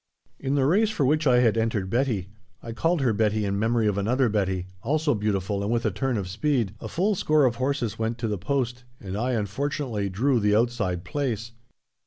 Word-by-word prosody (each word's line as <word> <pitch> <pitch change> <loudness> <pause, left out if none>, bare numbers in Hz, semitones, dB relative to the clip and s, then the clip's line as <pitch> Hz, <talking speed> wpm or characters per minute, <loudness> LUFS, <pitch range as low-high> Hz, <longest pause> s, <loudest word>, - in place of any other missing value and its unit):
In 135 +1 -1
the 135 -2 +2
race 205 +9 +3
for 205 -11 0
which 155 +3 +2
I 125 -1 +5
had 115 -2 +3
entered 110 -4 0
Betty 115 -7 0 0.3
(I 115 - -6
called 165 +7 0
her 125 -4 +2
Betty 105 0 +1
in 100 0 -1
memory 115 +1 +1
of 100 -1 +1
another 125 +5 +2
Betty, 95 -4 -1 0.2
also 150 +5 +1
beautiful 100 -2 -1
and 100 +2 -1
with 120 0 0
a 110 - +2
turn 120 +5 -1
of 95 -3 -3
speed!) 115 +1 0
a - - -5
full 195 +5 +1
score 155 -6 +3
of 120 -2 +1
horses 130 -5 -1
went 115 +1 -1
to 115 -1 -2
the 105 -3 -2
post, 125 +2 -2 0.2
and 95 -1 -6
I, 125 +4 -1
unfortunately, 115 - -2
drew 120 +7 +1
the 105 -1 +2
outside 105 -7 0
place. 115 +1 -3
115 Hz, 210 wpm, -25 LUFS, 105-135 Hz, 0.3 s, I